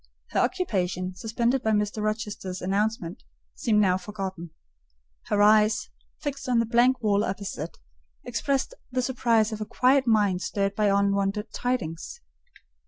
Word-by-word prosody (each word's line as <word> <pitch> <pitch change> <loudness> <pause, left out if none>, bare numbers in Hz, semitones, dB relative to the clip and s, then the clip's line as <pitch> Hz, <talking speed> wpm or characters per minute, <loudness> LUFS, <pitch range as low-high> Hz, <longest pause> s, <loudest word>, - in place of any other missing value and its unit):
Her - - +1
occupation, 185 - -1
suspended 235 +6 0
by 220 -2 +1
Mr. 210 0 0
Rochester's 210 -3 -3
announcement, 195 -1 -1 0.3
seemed 215 -2 +1
now 185 -2 +3
forgotten: 190 -3 -6 0.8
her 205 0 +3
eyes, 215 0 +4 0.3
fixed 280 -3 -4
on 245 - +3
the 230 - +3
blank 240 +2 +3
wall 205 -1 +3
opposite, 190 -5 -4 0.5
expressed 275 - -1 0.2
the 255 0 0
surprise 235 -4 +2
of 215 0 -5
a - - -2
quiet 260 +1 +3
mind 205 -5 +3
stirred 195 0 -1
by 210 0 +1
unwonted 200 +1 +1
tidings. 245 - -3
210 Hz, 135 wpm, -26 LUFS, 195-235 Hz, 0.8 s, eyes